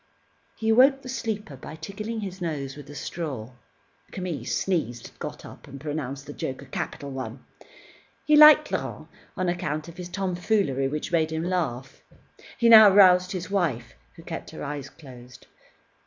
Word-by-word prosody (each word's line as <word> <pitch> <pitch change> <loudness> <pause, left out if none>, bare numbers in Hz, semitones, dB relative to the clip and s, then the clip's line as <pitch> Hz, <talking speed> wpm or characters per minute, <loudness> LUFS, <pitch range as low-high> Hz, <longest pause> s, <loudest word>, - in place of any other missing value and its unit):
He 220 - -1
awoke 270 +4 +5
the 255 - -8
sleeper 220 - -4
by 135 +4 -10
tickling 215 +7 -6
his 190 -2 -7
nose 140 -5 -4
with 145 -1 -12
a 145 - -10
straw. 135 -7 -5 0.6
Camille 175 -10 -5
sneezed, 125 - -2
got - - -7
up, - - -13
and 135 - -10
pronounced 140 -2 -5
the 145 - -8
joke 135 0 -5
a - - -13
capital 140 +1 -5
one. 130 -1 -7 0.8
He 305 - +5
liked 305 0 +8
Laurent - - -4 0.3
on 185 -1 -1
account 165 -3 -2
of 170 - -12
his 180 -1 -7
tomfoolery, 180 - 0
which 150 +4 -4
made 160 -2 +1
him 160 0 -2
laugh. 145 -8 -3 0.6
He 235 - +3
now 220 -2 +10
roused 185 -2 +6
his 185 +1 -5
wife, 155 - -1 0.2
who - - -13
kept - - -7
her - - -8
eyes 140 -1 -5
closed. 125 -5 -14
165 Hz, 165 wpm, -25 LUFS, 140-195 Hz, 0.8 s, now